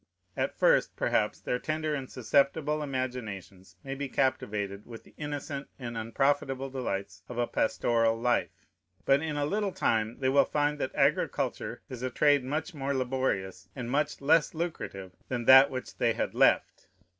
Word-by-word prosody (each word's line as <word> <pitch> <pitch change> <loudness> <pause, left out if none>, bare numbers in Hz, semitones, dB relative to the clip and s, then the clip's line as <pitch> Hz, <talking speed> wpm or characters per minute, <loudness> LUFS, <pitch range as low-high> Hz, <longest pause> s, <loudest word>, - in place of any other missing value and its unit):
At - - -2
first, - - +3
perhaps, - - 0
their 125 - -2
tender 155 +1 -2
and 135 -3 -4
susceptible 140 +5 +1
imaginations 115 -9 -5
may 135 - -5
be 140 0 -4
captivated 105 -7 -1
with 115 -2 -10
the - - -20
innocent 145 -1 -5
and 120 -3 -6
unprofitable 135 +3 0
delights 100 -8 -4
of 120 - -7
a 120 - +2
pastoral 115 0 +1
life; 120 +1 -1 0.4
but 135 +1 +4
in 155 -2 -3
a 145 - +1
little 205 +5 -1
time 115 -11 0
they 130 -1 +1
will 140 +1 +5
find 150 0 0
that 130 - -3
agriculture - - 0
is 125 -2 -8
a 130 - -1
trade 145 +1 +3
much 155 +8 -3
more 140 -1 -2
laborious 100 -8 -2
and 120 -1 -5
much 145 +1 0
less 160 +3 +3
lucrative 130 - -4 0.2
than 120 -2 -2
that 135 +2 +9
which 130 -2 -6
they - - +2
had - - -2
left. - - +2
130 Hz, 165 wpm, -29 LUFS, 115-145 Hz, 0.4 s, that